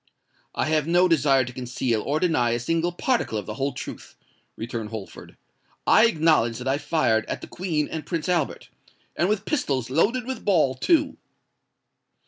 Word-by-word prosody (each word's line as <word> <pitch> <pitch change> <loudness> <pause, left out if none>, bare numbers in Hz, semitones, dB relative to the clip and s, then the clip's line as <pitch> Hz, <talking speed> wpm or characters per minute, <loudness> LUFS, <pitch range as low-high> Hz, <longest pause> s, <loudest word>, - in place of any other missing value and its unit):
"I - - 0
have 155 -1 +1
no 175 +2 +4
desire 140 -5 +3
to 125 - -8
conceal 125 -2 -2
or 145 +6 -1
deny 155 -10 +2
a 120 - -1
single 165 +7 0
particle 205 - -1
of 105 - -4
the - - -5
whole 140 +1 -2
truth," 125 - -9 0.4
returned 115 -1 -5
Holford. 110 -3 -9 0.5
"I 230 - +6
acknowledge 155 - +2
that 125 +2 -6
I 135 +2 +1
fired 145 -8 +1
at - - -4
the - - -8
Queen 160 -5 -2
and 160 -1 -5
Prince 165 +2 -3
Albert—and 175 +1 -3
with 210 0 -1
pistols 135 - -1
loaded 225 - +1
with 260 0 -5
ball, 160 -10 +3
too." 290 - +1
150 Hz, 165 wpm, -24 LUFS, 125-175 Hz, 0.5 s, I